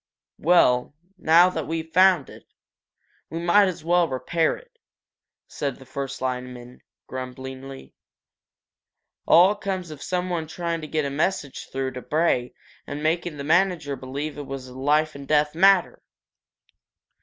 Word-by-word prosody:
"Well, 145 -6 +3 0.2
now 170 +3 +5
that 160 -4 -4
we've 160 0 -4
found 185 -5 +5
it, - - -14 0.8
we 165 - -5
might 175 +4 +4
as 175 -3 -5
well 175 0 +3
repair 135 +6 0
it," - - -20 0.7
said 140 -3 -3
the 130 - -15
first 135 +1 -6
lineman, 125 -1 -5 0.2
grumblingly. 130 +1 -8 1.3
"All 180 +5 +7
comes 190 -4 -4
of 150 -2 -10
someone 180 -1 -2
trying 170 +1 -3
to 155 - -7
get 155 -1 -1
a 140 - -3
message 150 -1 -2
through 135 0 -2
to 125 -1 -7
Bray 150 -6 0 0.3
and 145 +1 -5
making 165 0 -1
the 140 - -5
manager 165 -2 +1
believe 140 +3 -5
it 145 - -7
was 135 -1 -6
a 125 - -12
life 150 +3 +1
and 140 -1 -10
death 150 -1 +2
matter!" 190 +2 +4
155 Hz, 145 wpm, -24 LUFS, 135-175 Hz, 1.3 s, All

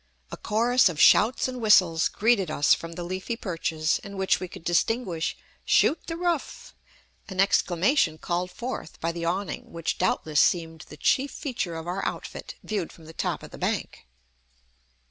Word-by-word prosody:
A - - -4
chorus 235 +1 +3
of 160 -4 -6
shouts 225 +9 +5
and 255 -1 -6
whistles 180 -7 +5
greeted 210 -5 +2
us 145 -1 +4
from 165 0 -4
the 175 +1 -6
leafy 185 +6 -4
perches, 165 -6 -1
in 200 0 -8
which 190 0 +2
we 185 - -5
could 165 - -12
distinguish 175 -1 0 0.3
"Shoot 320 - +2
the 330 - -4
roof!" 345 -4 -2 0.6
an 190 -1 -6
exclamation 185 - +2
called 175 +2 -2
forth 235 -3 -6
by 165 - -1
the 170 0 -5
awning, 185 +4 -3
which 165 -1 -3
doubtless 155 -4 +2
seemed 165 -2 0
the 150 - -11
chief 270 - +2
feature 235 - -4
of 160 0 -6
our 185 +3 -3
outfit, - - -5
viewed 200 -6 -3
from 165 - -16
the 160 - -11
top - - -3
of - - -11
the - - -11
bank. 60 - -3
180 Hz, 170 wpm, -26 LUFS, 165-225 Hz, 0.6 s, shouts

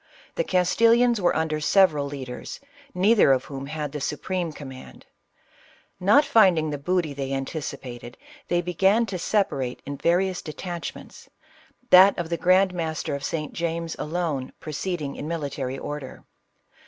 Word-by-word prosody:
The - - 0
Castilians 230 - +3
were 175 - +2
under 160 -1 0
several 155 -3 +3
leaders, 130 -3 -7 0.4
neither 195 -3 +5
of 130 -1 +2
whom 135 -1 -7
had 150 -1 -4
the 150 0 -5
supreme 175 +4 -2
command; 135 -3 -11 0.9
not 210 +11 +5
finding 185 - +4
the 145 - -4
booty 170 0 0
they 135 -1 -4
anticipated 130 -3 -6 0.3
they 175 0 +1
began 190 +6 +2
to 190 -4 -5
separate 170 -11 -1
in 140 0 -5
various 180 +3 +1
de 155 - -7
tachments, 175 -1 -7 0.6
that 190 +2 +8
of 170 -2 -3
the 170 - 0
grand 185 +1 +3
master 160 -4 -3
of 140 0 -4
St. 150 -2 -3
James 165 0 -3
alone 155 -5 -3
proceeding 155 -1 -4
in 145 - -5
military 140 -5 -3
order. 145 -1 -7
165 Hz, 140 wpm, -25 LUFS, 140-185 Hz, 0.9 s, that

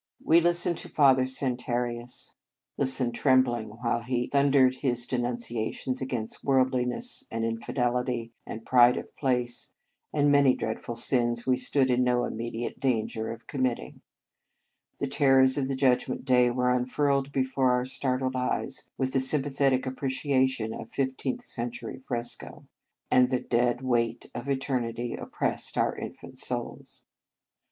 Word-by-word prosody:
We 165 +2 +5
listened 175 0 +1
to - - -9
Father 130 -3 +4
San 130 -1 -1
tarius, 120 -1 -4 0.4
listened 130 -3 0
trembling 120 -1 +2
while 115 +2 -2
he 125 +1 -1
thundered 140 -2 +4
his 120 -3 -1
denunciations 120 +1 -2
against 125 -4 -4
worldliness, 130 - 0
and 115 0 -2
infidelity, 120 0 -1
and 115 0 -8
pride 125 -1 +6
of - - -7
place, 125 -3 -1 0.4
and 145 -1 +3
many 140 -2 +5
dreadful 110 +1 -4
sins 120 0 +1
we 130 - +3
stood 130 +1 +1
in 125 +1 +3
no 125 -1 +2
immediate 115 +1 -4
danger 110 -4 -1
of 115 0 -8
com 135 - -4
mitting 125 -2 -2 1.0
The - - -1
terrors 135 -1 +4
of 140 -2 0
the 135 - -1
Judgment 130 -1 +1
Dav 125 -2 +4
were 125 0 +2
unfurled 135 +2 +1
before 130 -1 +1
our 125 0 +1
startled 130 0 -1
eyes 130 +1 -2
with 130 -1 -1
the 135 - +3
sympathetic 135 -1 +2
apprecia 130 0 +1
tion 110 -4 -4
of - - -7
a - - -27
fifteenth 130 -1 -2
century 120 -1 -5
fresco, 120 -1 -4 0.5
and 125 0 +5
the 130 -1 +1
dead 120 +1 +1
weight 120 -3 -1
of 120 +3 -6
eternity 120 -3 -2
oppressed - - -3
our - - +1
infant - - -8
souls. - - -5
125 Hz, 145 wpm, -28 LUFS, 120-135 Hz, 1.0 s, pride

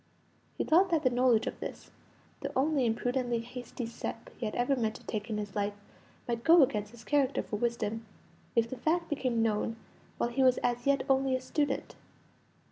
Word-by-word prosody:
He - - +1
thought 365 +4 +4
that 325 -3 +2
the 255 - +3
knowledge 245 -2 +3
of - - -4
this, - - -7 0.5
the - - -4
only 275 -2 +2
imprudently 245 +1 0
hasty 245 +1 -6
step 230 0 -6
he 230 - -3
ever 245 +5 +1
meant 225 -3 -1
to - - -12
take 215 +1 -4
in 215 - -1
his 205 -2 -5
life, 205 0 -1 0.5
might 235 -1 -2
go 330 -1 +8
against 210 -5 0
his 235 +1 -14
character 280 -2 +1
for 210 - -4
wisdom, 225 -1 -1 0.5
if 230 -1 +3
the 260 - -6
fact 330 +7 0
became 255 -6 0
known 225 0 0 0.4
while 235 - 0
he 265 +3 0
was 255 -1 +5
as 245 +1 0
yet 280 -1 +3
only 270 -1 +3
a - - 0
student. 275 +2 -1
245 Hz, 190 wpm, -31 LUFS, 225-270 Hz, 0.5 s, go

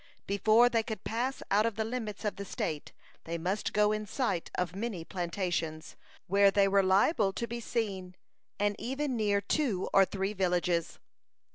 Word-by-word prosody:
Before 215 +4 +4
they 230 -2 +2
could 220 -1 -6
pass 245 +4 -2
out 210 +3 +4
of 230 - -3
the 220 - -1
limits 220 -3 -4
of 210 - -1
the 200 - -4
state, 155 -5 -4 0.3
they 170 +1 -3
must 185 +5 -2
go 210 0 +3
in 215 0 -2
sight 200 -8 -1
of 180 0 -2
many 200 -5 -4
plantations, 170 -3 -3 0.3
where 200 +1 +5
they 195 0 +3
were 195 0 +4
liable 195 - +3
to 235 - -2
be 235 +1 -5
seen, 195 -6 -3 0.4
and 205 0 +1
even 270 +2 -2
near 205 -3 +1
two 205 -3 0
or 195 - +7
three 195 +1 -3
villages. 180 -3 0
200 Hz, 170 wpm, -30 LUFS, 185-225 Hz, 0.4 s, or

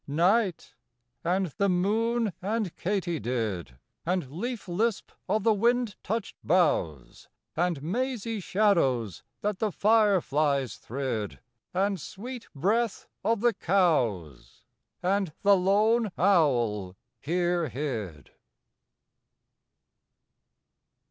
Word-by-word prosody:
Night 180 +6 +1 0.5
and 185 +3 +1
the 200 0 +3
moon 215 +4 +1
and 205 -1 -2
katydid, 125 - -2 0.3
And 175 -6 -1
leaf 225 - -4
lisp 210 +5 -1 0.2
of 215 -1 +1
the 225 - +4
wind 235 +1 +1
touched 220 +1 -3
boughs; 145 - 0 0.3
And 170 -4 0
mazy 230 - -2
shadows 150 - +1 0.2
that 205 -2 -1
the 215 -2 0
fire 210 -1 +4
flies 140 - 0
thrid; 120 -5 -4 0.3
And 195 -1 0
sweet 240 - -8
breath 210 +8 0 0.2
of 225 -2 +1
the 240 0 +3
cows; 125 - 0 0.4
And 190 -3 +1
the 200 0 +6
lone 210 +4 +3
owl 120 - +2 0.2
here 175 0 0
hid. 110 - -5
185 Hz, 95 wpm, -28 LUFS, 140-210 Hz, 0.5 s, the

